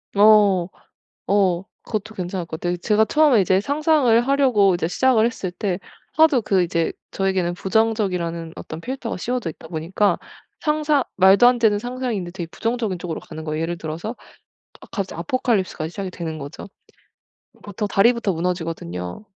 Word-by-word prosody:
어. 205 Hz, -4 st, +5 dB, 0.6 s
어 190 Hz, -2 st, +2 dB, 0.2 s
그것도 215 Hz, 0 st, -4 dB
괜찮을 180 Hz, -1 st, -4 dB
것 160 Hz, -1 st, -7 dB
같아요. 175 Hz, 0 st, -1 dB
제가 215 Hz, +4 st, +2 dB
처음에 290 Hz, -8 st, +4 dB
이제 185 Hz, +1 st, +3 dB
상상을 285 Hz, -2 st, +3 dB
하려고 250 Hz, -9 st, +4 dB
이제 170 Hz, -2 st, -1 dB
시작을 235 Hz, +3 st, +3 dB
했을 215 Hz, -6 st, -3 dB
때 185 Hz, 0 st, -2 dB, 0.3 s
하도 305 Hz, -6 st, +4 dB
그 195 Hz, -3 st, +2 dB
이제 165 Hz, -1 st, 0 dB, 0.2 s
저에게는 190 Hz, -3 st, 0 dB
부정적이라는 185 Hz, -6 st, -1 dB
어떤 160 Hz, -, -8 dB
필터가 255 Hz, -4 st, -4 dB
씌워져 240 Hz, -3 st, -2 dB
있다 160 Hz, -, -14 dB
보니까 170 Hz, +4 st, 0 dB, 0.4 s
상상 300 Hz, -3 st, +1 dB
말도 190 Hz, +5 st, +7 dB
안 245 Hz, 0 st, +4 dB
되는 215 Hz, -3 st, +3 dB
상상인데 245 Hz, -7 st, -4 dB
되게 175 Hz, -3 st, -6 dB
부정적인 225 Hz, -5 st, -2 dB
쪽으로 170 Hz, -3 st, -4 dB
가는 160 Hz, -1 st, -9 dB
거예요. 155 Hz, 0 st, -3 dB
예를 170 Hz, +1 st, -2 dB
들어서 170 Hz, +9 st, -5 dB, 0.7 s
아 -, -, -13 dB
갑자기 195 Hz, -5 st, -4 dB
아포칼립스가 190 Hz, -5 st, -1 dB
시작이 190 Hz, +1 st, -5 dB
되는 160 Hz, -3 st, -5 dB
거죠. 145 Hz, +6 st, -8 dB, 1.0 s
보통 205 Hz, +1 st, -4 dB
다리부터 220 Hz, 0 st, +3 dB
무너지거든요. 165 Hz, -, -4 dB
195 Hz, 370 characters per minute, -22 LUFS, 175-230 Hz, 1.0 s, 말도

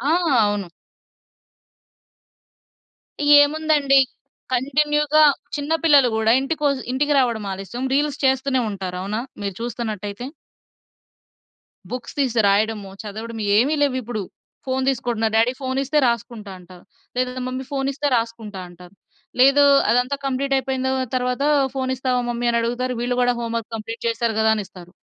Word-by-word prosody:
ఆ! -, -, -4 dB, 0.5 s
అవును. 200 Hz, -4 st, -4 dB, 2.7 s
ఏముందండి, 290 Hz, -2 st, +3 dB, 0.5 s
కంటిన్యూ‌గా 295 Hz, +3 st, +2 dB, 0.3 s
చిన్న 290 Hz, +2 st, -3 dB
పిల్లలు 285 Hz, -5 st, +6 dB
గూడా 220 Hz, 0 st, +3 dB
ఇంటికొ 295 Hz, +1 st, -1 dB, 0.2 s
ఇంటికి 290 Hz, +3 st, +1 dB
రావడం 235 Hz, -5 st, 0 dB
ఆలస్యం 195 Hz, +7 st, -6 dB
రీల్స్ 290 Hz, 0 st, 0 dB
చేస్తూనే 265 Hz, 0 st, +2 dB
ఉంటారు. 185 Hz, -2 st, -5 dB
అవునా! 210 Hz, +4 st, -3 dB, 0.2 s
మీరు 200 Hz, -1 st, -3 dB
చూస్తున్నట్టయితే. 220 Hz, -2 st, -5 dB, 1.6 s
బుక్స్ 250 Hz, -1 st, -6 dB
తీసి 250 Hz, -5 st, +1 dB
రాయడము, 205 Hz, 0 st, 0 dB
చదవడము, 220 Hz, +1 st, -6 dB, 0.2 s
ఏమి 275 Hz, +7 st, +2 dB
లేవు 280 Hz, -3 st, +1 dB
ఇప్పుడు. 220 Hz, -2 st, -4 dB, 0.4 s
ఫోన్ 260 Hz, 0 st, -1 dB
తీసుకోంటున్నారు. 235 Hz, -4 st, -1 dB
డ్యాడీ 230 Hz, +3 st, +3 dB
ఫోన్ 260 Hz, 0 st, -2 dB
ఇస్తే 280 Hz, +3 st, 0 dB
రాసుకుంటా 235 Hz, -3 st, -3 dB
అంటారు. 180 Hz, 0 st, -15 dB, 0.3 s
లేదా, 250 Hz, 0 st, 0 dB, 0.2 s
మమ్మీ 255 Hz, +1 st, -4 dB
ఫోన్ 270 Hz, -1 st, -1 dB
ఇస్తే 290 Hz, +2 st, -3 dB
రాసుకుంటా 225 Hz, -4 st, -4 dB
అంటారు 175 Hz, +2 st, -15 dB, 0.5 s
లేదు, 275 Hz, +2 st, +6 dB, 0.3 s
అదంతా 250 Hz, +3 st, +1 dB
కంప్లీట్ 275 Hz, +1 st, -1 dB
అయిపోయింది 260 Hz, 0 st, -1 dB, 0.3 s
తర్వాత 250 Hz, +1 st, -1 dB, 0.3 s
ఫోన్ 260 Hz, -1 st, -2 dB
ఇస్తావా 255 Hz, -1 st, -1 dB
మమ్మీ 240 Hz, 0 st, -2 dB
అని 235 Hz, -, +1 dB
అడుగుతారు 245 Hz, +2 st, -2 dB
వీళ్ళు 245 Hz, +1 st, -1 dB
కూడా 245 Hz, 0 st, +3 dB
హోంవర్క్ 230 Hz, -1 st, -3 dB
కంప్లీట్ 225 Hz, +1 st, -6 dB
చేసారు 230 Hz, 0 st, 0 dB
కదా! 220 Hz, 0 st, +3 dB
అని 215 Hz, -, -2 dB
ఇస్తారు. 180 Hz, -2 st, -14 dB
245 Hz, 130 wpm, -21 LUFS, 220-270 Hz, 2.7 s, పిల్లలు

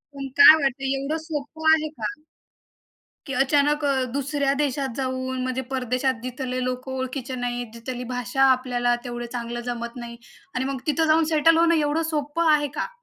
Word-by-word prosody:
पण 275 Hz, -1 st, -5 dB
काय 320 Hz, -7 st, +11 dB
वाटतंय, 270 Hz, 0 st, 0 dB
एवढं 295 Hz, +4 st, -2 dB
सोपं 315 Hz, +1 st, -2 dB
आहे 310 Hz, -1 st, +1 dB
का? 310 Hz, -, -4 dB, 1.2 s
की 275 Hz, -, -4 dB
अचानक 290 Hz, +2 st, +2 dB
अ, 270 Hz, -2 st, +1 dB
2ऱ्या 280 Hz, 0 st, 0 dB
देशात 270 Hz, -3 st, -2 dB
जाऊन 260 Hz, -1 st, -2 dB
म्हणजे 255 Hz, 0 st, -2 dB
परदेशात 255 Hz, +1 st, 0 dB
जिथले 255 Hz, 0 st, -3 dB
लोकं 255 Hz, +1 st, -4 dB
ओळखीचे 260 Hz, 0 st, -4 dB
नाहीत, 245 Hz, -1 st, -3 dB
जिथली 245 Hz, +2 st, -6 dB
भाषा 250 Hz, +2 st, 0 dB
आपल्याला 245 Hz, -1 st, +1 dB
तेवढं 240 Hz, -1 st, -5 dB
चांगलं 240 Hz, 0 st, -4 dB
जमत 235 Hz, 0 st, -5 dB
नाही. 235 Hz, -1 st, -8 dB, 0.4 s
आणि 255 Hz, +1 st, -1 dB
मग 270 Hz, -1 st, -3 dB
तिथं 315 Hz, +2 st, +2 dB
जाऊन 320 Hz, +1 st, +4 dB
सेटल 325 Hz, +2 st, +5 dB
होणं 335 Hz, 0 st, +4 dB
एवढं 305 Hz, +1 st, +1 dB
सोपं 310 Hz, +2 st, +1 dB
आहे 295 Hz, -1 st, +2 dB
का? -, -, -3 dB
265 Hz, 165 wpm, -24 LUFS, 250-295 Hz, 1.2 s, काय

